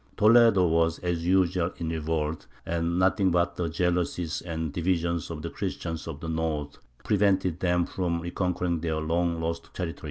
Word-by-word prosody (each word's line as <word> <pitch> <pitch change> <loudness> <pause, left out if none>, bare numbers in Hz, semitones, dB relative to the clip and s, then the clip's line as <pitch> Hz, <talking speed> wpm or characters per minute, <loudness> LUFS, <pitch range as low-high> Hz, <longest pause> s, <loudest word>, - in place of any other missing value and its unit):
Toledo 110 -3 +6
was, 80 0 +2
as 85 -2 -1
usual, 90 -1 +2
in 85 -2 -3
revolt, 80 -1 -2 0.2
and 85 +1 -1
nothing 95 +1 +3
but 85 0 +1
the 85 -2 -2
jealousies 85 0 -1
and 80 -3 -4
divisions 85 -1 0
of 80 -2 -6
the 85 - -4
Christians 80 -1 -4
of 80 -2 -6
the 80 - -5
north 80 -3 -2 0.2
prevented 95 -4 +2
them 90 -1 +2
from 85 -3 -2
reconquering 85 0 -1
their 80 -1 -1
long 85 +1 0
lost 85 0 -4
territory. 85 -3 -4
85 Hz, 160 wpm, -27 LUFS, 80-90 Hz, 0.2 s, Toledo